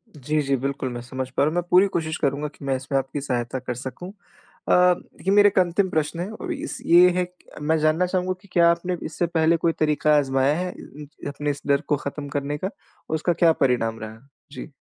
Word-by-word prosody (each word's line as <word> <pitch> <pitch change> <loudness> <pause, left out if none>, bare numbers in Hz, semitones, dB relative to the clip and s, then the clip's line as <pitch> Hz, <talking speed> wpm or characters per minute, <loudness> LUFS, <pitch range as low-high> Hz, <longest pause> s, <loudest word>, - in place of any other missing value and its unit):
जी, 150 +2 -1
जी, 140 -1 +1
बिल्कुल, 135 0 -3
मैं 120 - -5
समझ 130 +1 -5
पा 130 - 0
रहा 150 - +3
हूँ। 160 - -5
मैं 175 - +1
पूरी 185 +3 +6
कोशिश 160 -4 -2
करूँगा 145 0 -1
कि 145 -1 -12
मैं 135 -1 +1
इसमें 135 +1 -2
आपकी 135 +2 -5
सहायता 125 -2 -2
कर 125 -1 -4
सकूँ। 130 +8 -7 0.6
अ, - - +5
देखिए 180 +1 +2
मेरा 205 0 +7
एक 200 -1 +2
अंतिम 185 +2 +2
प्रश्न 155 0 -1
है 180 +3 -3
और 350 +11 -6
इस 315 +1 -5
ये 175 +2 +7
है 180 -1 0 0.3
मैं 160 +2 +1
जानना 155 +3 +2
चाहूँगा 185 0 -1
कि - - -19
क्या 170 -1 +5
आपने 175 +1 -2
इससे 170 +2 -2
पहले 165 0 +2
कोई 165 +1 +1
तरीका 150 0 +3
आज़माया 135 0 +2
है 180 0 -2
अ - - -15 0.2
इंच 150 0 -10
अपने 145 +1 -2
इस 145 - -7
डर 140 0 +3
को 150 - +2
खत्म 145 +1 -6
करने 145 +1 -3
का? 185 - -3 0.4
और 160 - 0
उसका 165 +2 0
क्या 170 0 +4
परिणाम 115 -3 +1
रहा? 110 0 -8 0.3
जी। 150 - -9
150 Hz, 230 wpm, -23 LUFS, 135-175 Hz, 0.6 s, मेरा